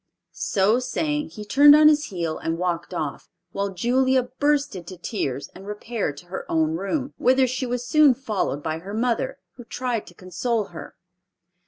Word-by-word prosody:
So 205 +5 +2
saying, 295 +4 -2
he 210 - -9
turned 290 +7 +7
on 305 0 +7
his 300 -1 +4
heel 170 -5 -3
and 165 0 -2
walked 175 -1 -2
off, 155 -5 -4 0.2
while 200 0 -2
Julia 255 +6 +2
burst 285 +1 0
into 180 0 -8
tears 140 - -3
and 195 +2 -12
repaired 210 -7 -3
to 175 - -12
her 180 +2 -7
own 160 -1 +2
room, 260 - -2
whither 260 +1 +4
she 255 +1 -2
was 245 0 -3
soon 295 -1 +5
followed 210 - -2
by 160 0 -2
her 195 +5 -7
mother, 235 0 0 0.2
who 245 - -9
tried 240 -1 -3
to 175 - -14
console 210 +6 -2
her. - - -9
225 Hz, 175 wpm, -24 LUFS, 180-260 Hz, 0.2 s, turned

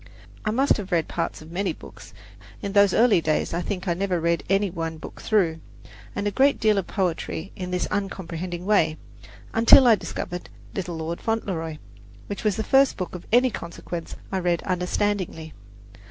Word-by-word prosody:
I 215 - 0
must 265 +6 +3
have 200 -3 -6
read 170 -2 +2
parts 165 -2 -3
of 160 - -13
many 195 +3 -1
books - - -13 0.5
(in 200 - -4
those 200 -2 +6
early 225 -6 +4
days 155 0 0
I 170 - 0
think 190 +1 -4
I 175 - +2
never 185 0 0
read 170 +1 +1
any 195 0 +2
one 165 -2 -4
book - - -10
through) 175 -7 +2 0.6
and 200 - -2
a 205 - +1
great 275 +6 +3
deal 215 -2 +3
of 190 - -4
poetry 185 -2 -2
in 180 -1 -5
this 180 0 0
uncomprehending 180 -3 -3
way, 165 -7 +3 0.6
until 230 +4 +8
I 235 - +8
discovered 180 -3 -4 0.2
"Little 180 -3 -3
Lord 165 +1 -4
Fauntleroy," 180 -8 -2 0.5
which 205 - -6
was 210 -3 +2
the 220 - -2
first 270 +4 +4
book 185 - -4
of 180 - -8
any 250 +2 +5
consequence 170 -2 -6 0.2
I 190 - 0
read 175 -2 0
understandingly. 180 -3 -1
185 Hz, 180 wpm, -25 LUFS, 170-205 Hz, 0.6 s, until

